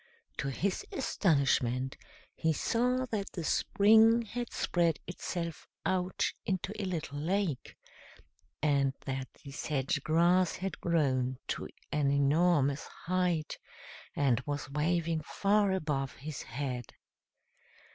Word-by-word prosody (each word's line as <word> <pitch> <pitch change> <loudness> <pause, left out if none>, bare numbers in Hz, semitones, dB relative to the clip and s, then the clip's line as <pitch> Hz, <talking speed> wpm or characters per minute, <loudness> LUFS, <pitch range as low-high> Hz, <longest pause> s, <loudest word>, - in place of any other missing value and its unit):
To 140 - -2
his 185 +8 -1
astonishment 135 - +1 0.4
he 160 0 +1
saw 250 - +1
that 205 -3 -3
the 170 - -4
spring 220 +7 +5
had 240 +2 -5
spread 170 -3 +1
itself 170 -2 -5 0.2
out 185 0 +1 0.2
into 190 +1 -2
a - - -2
little 160 -6 -3
lake, 175 -3 -1 0.9
and 140 -3 +2
that 130 -1 -3 0.2
the 140 - -9
sedge 140 -1 -1
grass 170 +4 +3
had 190 0 -5
grown 130 -6 +1
to - - -2 0.2
an 145 -2 +2
enormous 140 0 +3 0.2
height, 175 -3 0 0.6
and 135 -5 +3
was 145 -2 -3
waving 165 +2 0
far 200 +5 +2
above 150 -7 -1
his 145 +1 -6
head. 125 -2 -4
160 Hz, 115 wpm, -31 LUFS, 140-185 Hz, 0.9 s, spring